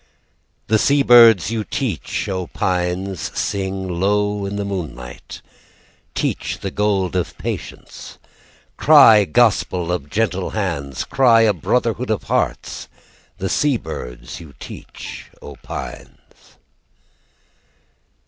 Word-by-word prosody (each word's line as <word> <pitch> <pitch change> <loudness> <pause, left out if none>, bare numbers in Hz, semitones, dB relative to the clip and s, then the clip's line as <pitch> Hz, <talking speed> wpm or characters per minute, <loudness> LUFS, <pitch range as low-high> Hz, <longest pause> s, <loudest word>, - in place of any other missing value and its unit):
"The 110 0 +2
sea 140 +4 +3
bids 115 -6 +7
you 110 -2 -1
teach, - - -3
O 95 -2 -3
Pines, 90 +1 -2
"Sing 95 -1 -2
low 100 +3 0
in 100 - -4
the 100 0 -3
moonlight; 80 -11 -7 0.7
"Teach - - -2
the 95 - -4
gold 100 -3 0
of 90 - -2
patience, - - -7 0.6
"Cry 115 -9 +7
gospel 90 -3 +2
of 80 -5 -3
gentle 95 -1 -1
hands, 70 - -3
"Cry 120 -4 +4
a 110 -2 +4
brotherhood 85 - -1
of - - -1
hearts. - - -2 0.5
"The 95 0 -3
sea 145 +5 +1
bids 60 - -8
you 75 -5 -13
teach, - - -10
O 75 - -10
Pines." - - -10
95 Hz, 110 wpm, -20 LUFS, 90-105 Hz, 0.7 s, bids